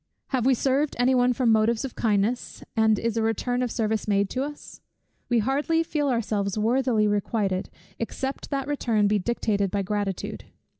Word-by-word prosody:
Have 255 -2 +1
we 265 - +5
served 275 +4 +1
any 245 +2 +3
one 250 0 +4
from 245 -1 +2
motives 220 +3 +2
of 265 - -6
kindness, 215 +2 -1
and 220 -1 +4
is 230 +1 -1
a - - +2
return 235 +3 0
of 250 - 0
service 220 -1 -1
made 200 -1 +1
to 255 - -1
us? 295 +1 -9 0.5
We 240 - +3
hardly 285 +8 +1
feel 295 -3 -1
ourselves 210 -4 -1
worthily 230 0 +2
requited, 205 -2 -1 0.3
except 265 +4 -4
that 275 -1 -2
return 230 -8 +1
be 210 0 +2
dictated 200 -2 0
by 200 +1 -1
gratitude. 205 -1 -3
230 Hz, 170 wpm, -25 LUFS, 210-260 Hz, 0.5 s, we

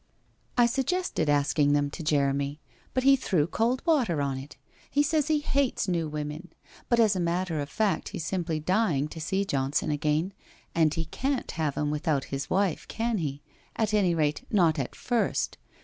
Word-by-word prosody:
' - - -40
I 240 - +6
suggested 270 - 0
asking 145 0 +3
them 145 -1 +1
to - - -7
Jeremy, 140 -1 0 0.4
but 255 - +2
he 275 +1 +7
threw 185 - +1
cold 230 +9 0
water 255 - +2
on 135 -2 -1
it. 135 +2 -11 0.3
He 290 +1 +3
says 295 0 +1
he 310 -1 +3
hates 275 -7 0
new 170 -3 0
women. 150 +3 -5 0.4
But, 235 - +3
as 215 -3 +4
a - - -1
matter 170 -1 0
of 145 0 -3
fact, 210 +6 0
he's 160 - -5
simply 170 -4 -1
dying 165 -4 +1
to 160 - -8
see 190 +5 0
Johnson 140 -3 0
again 150 +5 0 0.4
and 160 -2 +3
he 165 +1 -2
can't 265 - -2
have 155 -3 -1
him 150 0 0
without 150 -2 0
his 135 +1 -3
wife, 190 -3 0
can 230 -1 -1
he, 145 -3 -4 0.3
at 215 -1 0
any 190 -5 +3
rate, 150 -2 0
not 170 -7 +3
at 130 - -3
first. 240 -2 -1
165 Hz, 185 wpm, -28 LUFS, 150-220 Hz, 0.4 s, he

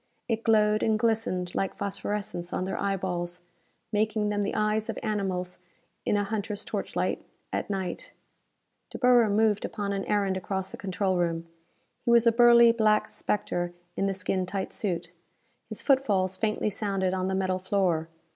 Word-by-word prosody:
It 225 -1 -1
glowed 215 -1 +4
and 220 -1 +2
glistened 215 -6 0
like 195 - -1
phosphorescence 200 -3 -3
on - - -1
their 190 +1 -3
eyeballs, 180 -3 -2 0.5
making 215 0 +1
them 205 0 0
the 200 - -1
eyes 215 0 +1
of - - -3
animals 190 -4 -1 0.5
in 205 - +3
a 205 - +1
hunter's 210 0 -3
torchlight, - - -2 0.3
at - - -2
night. 190 -3 -3 0.8
De - - -7
Boer 245 -3 +5
moved 210 0 +2
upon 200 -2 -3
an 195 -1 -2
errand 200 -2 +1
across 190 0 -3
the - - -8
control 190 -1 -1
room. 165 -1 0 0.6
He - - -1
was 235 0 +6
a 230 - +6
burly 235 0 +7
black 215 -2 +2
spectre 175 -3 -2 0.2
in 195 - 0
the 195 - -1
skin 185 0 -1
tight 190 0 -3
suit. 175 -4 -3 0.6
His - - -6
footfalls 205 -10 +2
faintly 215 +1 0
sounded 195 -2 -1
on 185 0 -1
the 190 - 0
metal 185 -1 0
floor. 185 -4 0
200 Hz, 165 wpm, -28 LUFS, 185-215 Hz, 0.8 s, burly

